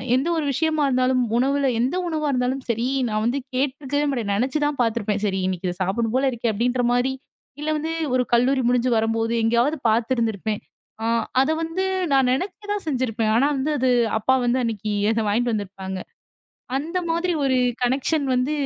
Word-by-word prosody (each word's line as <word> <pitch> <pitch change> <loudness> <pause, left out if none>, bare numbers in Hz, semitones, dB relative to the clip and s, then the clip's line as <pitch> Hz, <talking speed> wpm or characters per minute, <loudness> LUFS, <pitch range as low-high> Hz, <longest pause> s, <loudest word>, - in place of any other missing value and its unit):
எந்த 265 +5 +1
ஒரு 310 - -1
விஷயமா 310 +1 +1
இருந்தாலும், 255 0 +2 0.2
உணவுல 275 +1 +2
எந்த 255 +8 +1
உணவு 310 -2 -2
இருந்தாலும் 255 +1 -1
சரி, 235 +2 0 0.2
நான் 215 +4 0 0.2
கேட்டுருக்கவே 280 +2 -1
மாட்டேன். 230 -7 -2
நினைச்சுதான் 290 +5 0
பாத்துருப்பேன். 215 -3 0
சரி 190 -2 0
இன்னக்கி 185 -1 -2
இத 175 - -4
சாப்புட்ணும் 225 +5 0
போல 270 - +1
இருக்கு, 235 -1 -2
அப்பிடின்றமாரி. 245 +3 +1 0.5
இல்ல 305 - -2
வந்து 320 +2 -3 0.2
ஒரு 250 -1 +2
கல்லூரி 260 +2 +2
முடிஞ்சு 250 0 +2
வரும்போது 225 +1 0
எங்காவது 240 +7 +2
பாத்து 225 +2 +1
இருந்து 230 -1 +1
இருப்பேன். 210 +2 -3 0.4
ஆ - - -1 0.4
அத 270 - +1
வந்து 330 +4 -2 0.3
நான் 265 -2 +4
நினைக்கதான் 410 +6 -3
செஞ்சு 260 -4 0
இருப்பேன். 220 0 0
ஆனா 275 - +4 0.3
அது 255 0 +2 0.3
அப்பா 260 +5 +3
வந்து 245 +2 +2
அன்னக்கி 215 -2 -3 0.2
அத 225 - 0
வாங்கிட்டு 235 +3 +1
வந்து 205 -2 -3
இருப்பாங்க. 190 0 -6 0.8
அந்த 325 +6 -2
மாதிரி 340 +2 0
ஒரு 265 -2 +2 0.3
கனெக்ஷன் 275 +4 +1
வந்து 255 +3 +1
250 Hz, 165 wpm, -23 LUFS, 225-280 Hz, 0.8 s, நான்